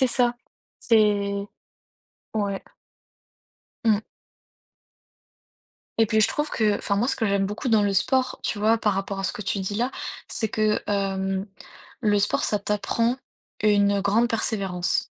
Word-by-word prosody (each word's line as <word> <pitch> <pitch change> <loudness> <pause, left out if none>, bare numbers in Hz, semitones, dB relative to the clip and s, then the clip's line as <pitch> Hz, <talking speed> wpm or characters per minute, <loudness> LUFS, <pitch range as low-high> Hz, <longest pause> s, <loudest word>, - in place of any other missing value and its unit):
C'est 260 - +4
ça, 245 -1 +2 0.5
c'est 205 -3 +2 0.9
ouais. 200 -2 -2 1.2
Mmh. 215 -2 +3 2.0
Et 225 - +5
puis 220 0 +2
je - - +4
trouve 295 +1 -1
que 210 -2 +1
enfin 200 - -1
moi, 230 +5 +2
ce - - +1
que 225 - 0
j'aime 200 -1 +1
beaucoup 210 +6 -4
dans 220 -3 +4
le 200 -1 +1
sport, 255 +6 +1
tu 210 - -2
vois? 220 +2 +3
Par 210 -3 +1
rapport 195 0 -3
à - - -4
ce - - 0
que 210 - -6
tu 195 +1 -1
dis 190 +2 -3
là, 240 +5 0 0.4
c'est 220 - 0
que, 215 0 +1
hem, 195 -1 -1 0.5
le 210 -3 +3
sport, 205 +1 +1
ça 210 - +1
t'apprend 220 +4 0 0.5
une 205 -1 +3
grande 210 +4 +2
persévérance. 195 -6 0
210 Hz, 155 wpm, -25 LUFS, 200-225 Hz, 2.0 s, Et